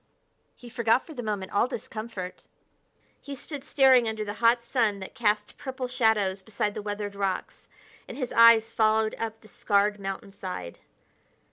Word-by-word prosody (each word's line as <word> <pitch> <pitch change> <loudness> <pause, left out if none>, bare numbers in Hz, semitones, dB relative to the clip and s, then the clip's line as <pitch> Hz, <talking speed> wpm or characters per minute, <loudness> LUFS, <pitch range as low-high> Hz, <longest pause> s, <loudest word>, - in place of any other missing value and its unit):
He 245 - -14
forgot 235 0 +1
for 320 - -10
the 250 - -5
moment 205 -4 -3
all 205 - +2
discomfort. 215 -6 -7 0.7
He 280 -1 -7
stood 280 +1 -7
staring 260 -5 +4
under 220 -1 -4
the 205 - -4
hot 235 +1 +4
sun 230 -4 +1
that 190 -1 -9
cast 210 -4 -1
purple 260 -2 -4
shadows 220 -6 +1
beside 205 0 -2
the 215 - -5
weathered 205 0 -4
rocks, 195 -2 -3 0.4
and 250 - -8
his 255 -4 -3
eyes 230 -1 +7
followed 220 -1 +2
up 225 -1 -4
the 215 - -17
scarred 205 0 +1
mountainside. 195 - -6
220 Hz, 155 wpm, -27 LUFS, 205-240 Hz, 0.7 s, eyes